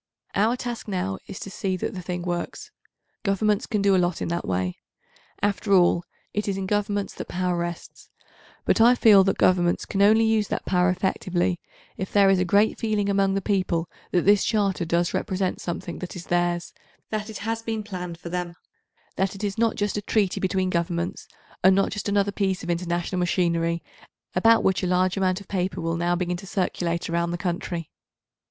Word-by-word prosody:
Our 220 +5 +2
task 240 -2 -5
now 180 - -2
is - - -7
to 195 - -6
see 190 -1 -2
that - - -3
the 185 - -5
thing 180 0 -4
works. 180 - -4 0.5
Governments 205 0 +1
can 210 -3 0
do 200 -1 +4
a 185 - +4
lot 175 -1 0
in - - -3
that 170 +1 -2
way. 90 -1 -1 0.6
After 205 0 +1
all, 175 -2 +4 0.3
it 210 +1 -2
is 195 -1 -1
in 195 - -3
Governments 205 0 -1
that - - -7
power 180 0 -1
rests, 170 0 -6 0.6
but - - +3
I 240 +2 +7
feel 210 -5 +7
that 195 - +1
Governments 175 -1 +3
can 195 - -1
only 220 +3 +6
use 220 -2 +2
that - - -3
power 180 -1 +3
effectively 180 -1 0 0.4
if 190 - -4
there 200 -1 +5
is 190 - +3
a 180 - +2
great 205 +4 +3
feeling 210 -3 0
among 195 -1 +2
the 195 - -1
people 185 -5 0 0.2
that 175 - +2
this 205 0 +5
Charter 200 -5 +1
does 170 +1 +1
represent 185 -1 -1
something 175 0 -5
that 180 - -6
is 175 - -7
theirs, 175 0 0 0.4
that 215 0 -3
it 215 - -6
has 225 0 -1
been 225 -1 -3
planned 180 -4 -6
for 170 - -8
them, 175 -1 -3 0.6
that 190 0 0
it 195 - -8
is 200 -1 -1
not 230 -1 +2
just 205 0 -1
a - - -1
treaty 205 -2 +1
between 190 -1 0
Governments 170 0 -2 0.4
and 190 +1 +7
not 195 - +2
just 210 -1 -3
another 200 0 +2
piece 190 -2 -1
of 175 - -1
international 175 +1 -1
machinery, 170 -2 +1 0.5
about 230 0 +4
which 190 - +2
a 185 - 0
large 180 0 +2
amount 185 -1 +1
of 200 - -14
paper 185 -1 -2
will 165 0 -1
now 175 +1 +1
begin 180 0 -1
to 195 - -10
circulate 175 -3 -1
around 170 0 0
the 175 - -2
country. 175 -2 -3
185 Hz, 200 wpm, -25 LUFS, 175-205 Hz, 0.6 s, I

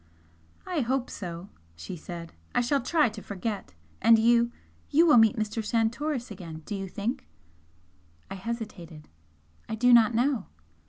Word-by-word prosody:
"I 360 -4 -2
hope 255 0 -1
so!" 175 0 -7 0.3
she 80 - -7
said 170 0 -8 0.2
"I - - +4
shall 275 +4 +1
try 305 +4 +3
to 215 -1 -9
forget! 200 - -5 0.3
And 230 0 +7
you 235 +1 +4 0.4
you 325 +4 +5
will 300 -6 +6
meet 225 -1 +5
Mr. 215 +1 -2
Santoris 235 +4 -1
again, 165 -5 -8
do - - -5
you 195 -1 -4
think?" 210 +7 -4 1.0
I - - -7
hesitated. 190 -7 -7 0.6
"I - - -2
do 245 +2 +4
not 235 -1 +6
know." 245 -3 +1
225 Hz, 150 wpm, -27 LUFS, 190-240 Hz, 1.0 s, And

